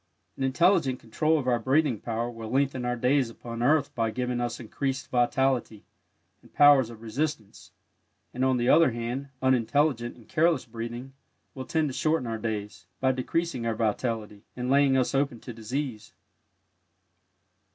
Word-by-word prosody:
An - - -10
intelligent 135 -1 +2
control 155 +8 +1
of 135 -4 -3
our 120 -2 +2
breathing 135 -1 +1
power 115 +2 -3
will 115 -2 -8
lengthen 130 0 0
our 125 0 0
days 125 +1 +2
upon 115 0 -8
earth 145 +4 +2
by 115 -1 0
giving 125 +1 -2
us 120 0 -3
increased 130 +3 -4
vitality 125 -3 +1 0.6
and - - -20
powers 145 -4 +6
of 115 -1 -12
resistance, 115 -2 -4 0.6
and, 125 - -2
on 130 -1 +3
the 120 0 0
other 160 +2 +6
hand, 120 +4 -4
unintelligent 130 0 +1
and 115 - -18
careless 160 -3 +2
breathing 120 +3 -7 0.4
will 130 -1 -7
tend 160 -2 0
to 135 - -4
shorten 155 -1 0
our 115 -1 -3
days, 105 -2 -5
by 130 0 +3
decreasing 130 +1 -2
our 115 - 0
vitality 110 -1 -2
and 125 +1 -2
laying 140 -1 +4
us 130 +1 +1
open 135 -3 0
to 120 - -8
disease. 115 -1 -5
125 Hz, 160 wpm, -27 LUFS, 115-140 Hz, 0.6 s, powers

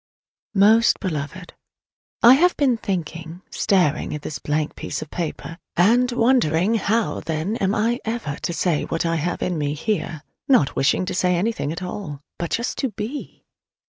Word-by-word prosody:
Most 220 +4 +5
Beloved: 180 0 -5 0.7
I 240 +2 +10
have 350 +6 +3
been 270 -4 +3
thinking, 170 -4 -5
staring 180 -9 +1
at 150 - -7
this 155 - -5
blank 150 0 -2
piece - - -4
of 155 - -16
paper, 165 0 -5 0.2
and 240 +7 +4
wondering 230 -6 +2
how 225 0 0
there 165 +6 -2
am 195 +2 +1
I 230 +3 +1
ever 225 -11 -3
to - - -3
say 170 -2 0
what 165 - -2
I 165 0 +1
have 175 +3 -2
in 175 -3 -1
me 145 0 -1
here 160 -4 -2 0.2
not 250 - +3
wishing 145 +6 +2
to - - -3
say 180 0 +2
anything 180 -5 -1
at 165 +3 -5
all, 180 -6 -6 0.2
but 170 -1 -2
just 235 - -2
to 265 - 0
be! 225 +6 -7
180 Hz, 170 wpm, -22 LUFS, 160-225 Hz, 0.7 s, I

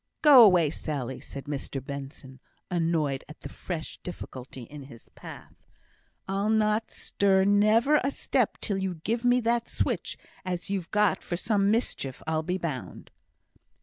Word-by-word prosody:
"Go 280 -6 +10
away, 175 -8 +5
Sally," 135 -5 -4
said 140 - -8
Mr 140 -1 -4
Benson, 135 0 -8 0.3
annoyed 165 -5 0
at 155 - -12
the - - -7
fresh 165 -4 -6
difficulty 130 -7 -8
in 140 +3 -10
his 120 -4 -15
path. - - -11 0.7
"I'll 195 +2 0
not 215 0 +2
stir 195 -1 +1
never 215 +8 +4
a 275 - +1
step 260 -4 0
till 200 -2 -1
you 190 -2 -2
give 225 +9 -2
me 245 0 +4
that 235 0 0
switch, - - -2 0.3
as 180 0 -3
you've 190 -4 -2
got 210 -1 +2
for 175 - -4
some 200 0 +1
mischief, 205 - -1
I'll 160 0 0
be 180 +3 -2
bound." 155 -8 -6
180 Hz, 150 wpm, -27 LUFS, 145-215 Hz, 0.7 s, Go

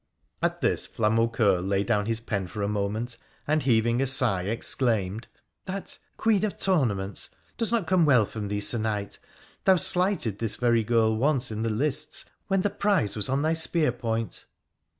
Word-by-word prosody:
At - - -1
this - - +1
Flamaucoeur 110 -3 +1
lay 100 +1 0
down 105 -2 0
his 115 -1 0
pen 100 -5 -3
for 105 +3 -5
a - - 0
moment, 105 +3 -2 0.3
and, 155 +1 +1
heaving 120 -1 +2
a 135 - +1
sigh, 125 -9 +2
exclaimed, 110 -1 -1 0.2
' - - -53
That 195 +1 -3
" - - -43
Queen 215 -3 +2
of 215 - -2
Tournaments 110 - 0
" - - -36
does 230 -2 0
not 230 -6 +1
come 180 0 +3
well 125 -7 +5
from 105 0 -6
thee, 105 0 -2
Sir 115 +3 +2
Knight! 105 -2 -3 0.5
Thou 190 - +6
slighted 180 - +1
this 115 -3 -1
very 115 -2 +2
girl 110 0 +2
once 130 0 +1
in 110 0 -4
the 115 - 0
lists 130 +6 -1 0.2
when 195 -1 +1
the 205 - 0
prize 200 - +1
was 105 +3 -2
on 135 +2 0
thy 160 +1 +2
spear 160 -3 +3
point.' 115 -3 -4
115 Hz, 190 wpm, -26 LUFS, 105-150 Hz, 0.5 s, Thou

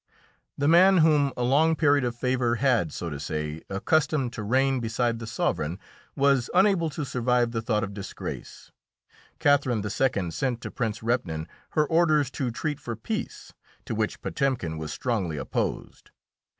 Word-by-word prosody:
The 145 - +1
man 185 +4 +6
whom 150 -4 +4
a 125 - -1
long 155 +6 +3
period 145 -3 +3
of 120 -1 -2
favour 125 -1 0
had, 120 - +2
so 85 +2 -5
to 70 - -5
say, 75 +1 -4
accustomed 135 +5 +1
to 110 - -5
reign 130 +5 +2
beside 115 0 -1
the 115 - -7
sovereign 85 -6 -1 0.4
was 135 -3 +2
unable 185 -3 +4
to 150 0 -4
survive 125 -2 +1
the 115 -1 -2
thought 110 -2 0
of 100 -2 -4
disgrace. 100 -1 -8 0.7
Catherine 135 -7 +2
II. 100 -4 0
sent 125 +4 -2
to - - -6
Prince 115 -4 -3
Repnin 95 -10 -1 0.3
her 155 - +5
orders 155 -4 +2
to 135 -3 -2
treat 145 +5 -3
for 120 -4 -5
peace, 110 - -5 0.3
to - - -4
which - - -2
Potemkin 120 - -1
was 80 -1 -5
strongly 100 -11 -2
opposed. - - -4
125 Hz, 160 wpm, -26 LUFS, 105-145 Hz, 0.7 s, man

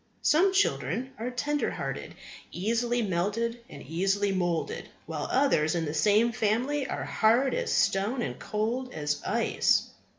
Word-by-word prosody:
Some 365 +6 +4
children 230 - 0
are 235 +2 -2
tender 290 +4 -1
hearted, - - -5 0.4
easily 235 +5 0
melted, 210 +5 -1
and 140 - -10
easily 195 +6 0
moulded; 175 -3 -2 0.2
while - - -4
others 175 - +2
in 165 -1 0
the 150 - -3
same 210 +8 +3
family 245 +6 0
are - - -3
hard 235 +5 +3
as - - -1
stone 215 +6 +1
and - - -5
cold 235 +5 -2
as 150 -1 -2
ice. - - +1
220 Hz, 140 wpm, -28 LUFS, 180-250 Hz, 0.4 s, Some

